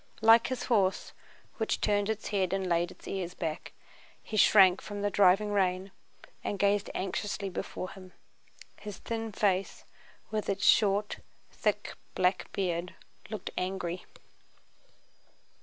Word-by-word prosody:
Like 225 +1 +7
his 255 0 -3
horse, 195 -6 +1 0.4
which 220 - -1
turned 205 0 +1
its 220 -1 -3
head 190 -3 0
and 190 -1 -1
laid 170 0 +1
its - - -14
ears 180 -2 -4
back, 160 -3 -4 0.5
he 220 - -6
shrank 190 -3 +6
from 205 -1 -6
the 205 - +1
driving 200 +2 +4
rain 190 -1 0 0.5
and 205 - -2
gazed 200 0 +2
anxiously 195 +1 -3
before 185 0 -5
him. 185 -2 -13 0.7
His 210 -2 -7
thin 225 -1 -4
face 195 -2 0 0.5
with 215 -1 -2
its 200 +1 0
short, 205 -1 +3 0.3
thick - - -1 0.2
black 185 +1 +1
beard 180 -2 -2 0.3
looked 215 -4 -5
angry. 180 -1 -3
195 Hz, 130 wpm, -30 LUFS, 185-210 Hz, 0.7 s, Like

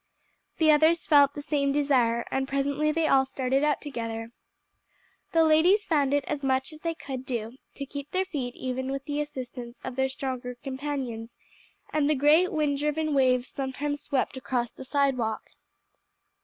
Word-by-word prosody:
The 315 -1 +5
others 315 +2 +4
felt 285 -2 +5
the 290 - -6
same 280 -2 +1
desire, 255 -5 +2
and 265 0 0
presently 280 +2 0
they 325 +1 +1
all 270 -2 +5
started 265 +1 -1
out 300 -1 +1
together. 230 -5 -5 1.0
The 330 -1 +4
ladies 340 +7 +4
found 290 -5 +2
it 285 -1 +1
as 295 -2 -3
much 265 +2 0
as 305 - -11
they 330 0 -2
could 260 -4 -6
do 235 -2 -4 0.2
to 280 - -5
keep 280 +1 -7
their 375 +1 0
feet 270 -10 -4
even 260 +1 -3
with 275 0 -4
the 290 0 -1
assistance 250 -4 -7
of 260 - -5
their 265 0 +1
stronger 255 -2 -4
companions, 260 -4 -5 0.6
and 300 -1 +2
the 305 - +3
great, 300 +6 +4
wind 295 -3 0
driven 300 +1 0
waves 255 -2 +3
sometimes 285 +2 -3
swept 270 -1 -1
across 245 -2 -2
the 265 - -10
sidewalk. 260 -6 0
275 Hz, 170 wpm, -27 LUFS, 260-295 Hz, 1.0 s, The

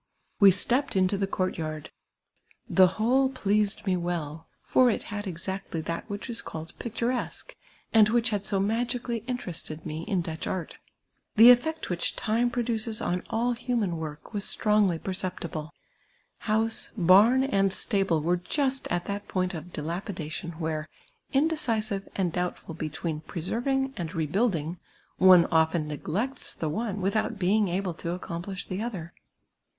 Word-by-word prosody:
\Ve 200 - +10
stepped 245 +9 +2
into 190 +1 +3
the 195 0 -1
court 185 -2 -2
yard; 155 -1 -5 0.8
the 185 -1 +6
whole 260 +5 +3
pleased 210 -5 +1
me 190 -2 +2
well: 165 -3 -3 0.2
for 255 -1 +4
it 225 - -1
had 205 0 -4
exactly 185 0 -4
that 170 +6 -4
which 205 +3 -5
is 235 -2 -3
called 160 +1 -8
])ietures(iue, 240 - -3 0.4
and 220 -2 +7
wliieh 235 +1 +2
had 205 -2 -2
so 200 -2 +1
magically 235 +3 -1
interested 175 -10 -4
mc 155 +1 -4
in 190 -5 +1
Dutch 160 -2 -5
art. 185 -3 -4 0.6
The 230 +3 +10
effect 315 +1 +1
which 175 - 0
time 230 +3 +1
produces 230 -2 -1
on 180 +1 -1
all 235 +2 +1
human 235 -7 -1
work 155 +4 -7
was 205 -1 -1
strongly 210 -6 +3
j)erce])tible. 170 -4 -4 0.7
House, 225 +1 0
barn, 205 +8 +6
and 195 -8 +2
stable 195 -7 +1
were 175 +2 +2
just 265 - -1
at 175 0 -1
that 200 0 -4
point 185 0 -1
of 160 -2 -6
dila])idation 170 -1 -5
where, 155 -2 -3 0.4
indecisive 230 -9 0
and 180 -4 0
doubt 180 0 -3
lid 165 -1 -8
between 155 0 -3
preserving 255 - -2
and 175 0 -4
rebuilding, 165 0 0 0.4
one 185 -2 +7
often 160 -1 +2
neglects 195 - -3
the 160 - -3
one 205 +4 -2
without 215 +4 0
being 200 +2 +2
able 185 0 -1
to 170 +1 -4
accomplish 180 +2 -5
the 190 +1 -4
other. 185 -8 -5
195 Hz, 150 wpm, -27 LUFS, 170-225 Hz, 0.8 s, Ve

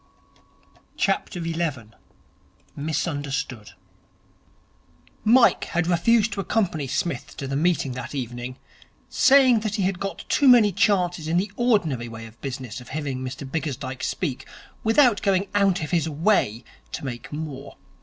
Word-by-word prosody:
11. 165 - -2 0.8
Misunderstood 140 - -3 1.5
Mike 240 +3 +5
had 175 0 -1
refused 210 +5 +3
to 200 - -5
accompany 185 -8 0
Psmith 170 +6 -3
to 140 - -5
the 135 - -3
meeting 160 -3 +1
that 125 +3 -6
evening, 125 0 -5 0.5
saying 260 -4 +5
that 215 -1 -3
he 195 -3 +1
got 195 +1 -6
too 285 - +3
many 235 -5 +7
chances 180 -4 +1
in 165 +2 +1
the 190 +2 0
ordinary 175 - +1
way 115 -1 -8
of 115 0 -15
business 130 -2 -6
of 120 - -13
hearing 140 -2 -3
Mr 130 +1 -6
Bickersdyke 135 -3 -4
speak, 145 -9 -3 0.4
without 225 -1 +4
going 195 -1 +1
out 195 -4 +2
of 150 - -5
his 165 -2 +1
way 150 - +1 0.3
to - - -5
make 120 -3 -6
more. 145 -2 -6
160 Hz, 135 wpm, -24 LUFS, 130-200 Hz, 1.5 s, many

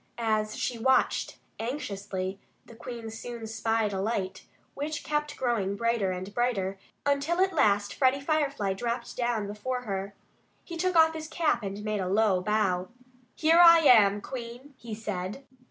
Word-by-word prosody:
As 215 -2 0
she 240 -2 -2
watched 265 +3 +2 0.2
anxiously, 200 -6 -4 0.3
the - - -14
Queen 230 -1 -7
soon 230 0 -7
spied 225 -1 -1
a 190 - -2
light, 195 -3 -3 0.3
which 295 +2 -4
kept 300 -1 -2
growing 225 -6 0
brighter 230 -3 0
and 185 +2 -6
brighter, 200 -6 -1 0.3
until 285 +5 +1
at 380 0 +3
last 205 -8 +2
Freddie 265 0 +2
Firefly 280 -9 0
dropped 235 +4 -4
down 240 -4 -1
before 210 +5 -4
her. 200 -3 -4 0.5
He 340 - -8
took 365 +2 0
off 320 -1 +6
his 315 -1 -6
cap 315 -6 0
and 200 0 -5
made 215 -2 -1
a 185 - -2
low 200 -2 +3
bow. 185 -3 0 0.5
"Here 330 +2 +5
I 335 -1 +9
am, 210 -8 +6
Queen!" 250 +3 -8
he 230 -4 -7
said. 210 +2 -5
225 Hz, 155 wpm, -28 LUFS, 200-275 Hz, 0.5 s, I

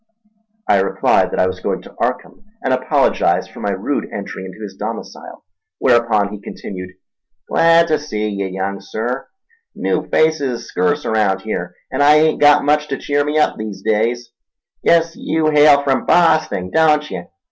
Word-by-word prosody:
I 100 - +4
replied 95 - +2
that - - -4
I - - +4
was 95 - -3
going - - -3
to - - -14
Arkham, - - -3 0.2
and 130 - +1
apologised 130 - +1
for - - -12
my - - -2
rude - - -2
entry 95 - -6
into 95 +3 -11
his 100 -2 -8
domicile, - - -8 0.3
whereupon 115 -5 +2
he 105 - -8
continued. 90 -2 -8 0.5
"Glad 165 0 +4
ta 155 - +3
see 110 -8 -4
ye, 100 -2 -3
young 95 +1 -4
Sir—new 385 - -5
faces 145 -6 +1
is - - -12
scurce 145 +12 -1
arount 105 -4 +1
here, 90 -4 -5 0.2
an' - - -1
I 145 +1 +6
hain't 155 +1 +2
got 145 -1 +5
much 150 +1 +2
ta 140 - -2
cheer 145 0 0
me 150 +1 -1
up 150 - +2
these 105 -3 -7
days. 115 +3 -1 0.5
Guess 165 0 +3
yew 155 -1 0
hail 145 -1 +5
from 135 -2 0
Bosting, 155 - +2
don't 150 -2 +2
ye? 85 - -6
130 Hz, 170 wpm, -18 LUFS, 100-150 Hz, 0.5 s, I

